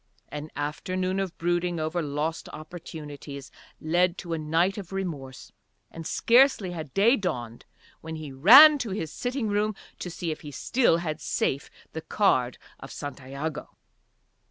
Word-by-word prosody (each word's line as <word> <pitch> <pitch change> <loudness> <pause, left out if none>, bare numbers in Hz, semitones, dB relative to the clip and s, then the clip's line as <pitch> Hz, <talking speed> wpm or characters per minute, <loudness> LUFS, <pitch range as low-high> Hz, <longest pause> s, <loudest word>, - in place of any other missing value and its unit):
An 150 +1 -6
afternoon 185 +6 -2
of 190 -3 -3
brooding 175 0 0
over 160 +3 -1
lost 150 +2 -3
opportunities 150 -4 -9 0.3
led 175 +3 +1
to 170 -3 -5
a 165 - -2
night 165 +6 +1
of 190 -2 -9
remorse, 155 -9 -5 0.4
and 165 -1 -7
scarcely 235 -6 +4
had 160 -5 -6
day 225 +6 +5
dawned 120 - -4 0.3
when 160 0 -7
he 155 -3 -7
ran 270 - +9
to 240 - -3
his 165 -5 -4
sitting 245 -2 -2
room 210 +1 0 0.2
to 180 - -5
see 170 -1 -4
if 155 - -6
he 150 - -8
still 200 - +2
had 155 -3 -4
safe 135 0 -1 0.2
the 160 - -4
card 130 - +1 0.2
of 135 - -10
Santiago. 145 +2 -6
165 Hz, 150 wpm, -26 LUFS, 150-190 Hz, 0.4 s, ran